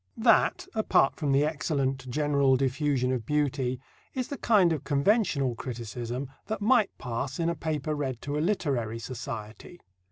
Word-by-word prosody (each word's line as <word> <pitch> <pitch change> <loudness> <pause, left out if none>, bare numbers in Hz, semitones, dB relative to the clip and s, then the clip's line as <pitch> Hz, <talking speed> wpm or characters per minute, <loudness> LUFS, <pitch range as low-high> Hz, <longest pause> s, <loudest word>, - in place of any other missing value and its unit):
That, 240 +10 +3
apart 215 -10 +3
from 145 -3 0
the 140 +2 +4
excellent 140 -4 -1
"general 140 -1 +2
diffusion 135 -1 +1
of 125 -3 -1
beauty," 135 -2 0 0.4
is 255 -2 -2
the 280 - -4
kind 195 -7 +4
of 150 - -4
conventional 145 - +2
criticism 120 +2 -5 0.2
that 220 -1 -2
might 220 0 +4
pass 125 +4 -4
in 165 0 +1
a 170 - -1
paper 155 -2 -2
read 135 -5 -3
to 145 0 -3
a - - 0
literary 135 - 0
society. 115 +5 -7
140 Hz, 155 wpm, -28 LUFS, 130-165 Hz, 0.4 s, the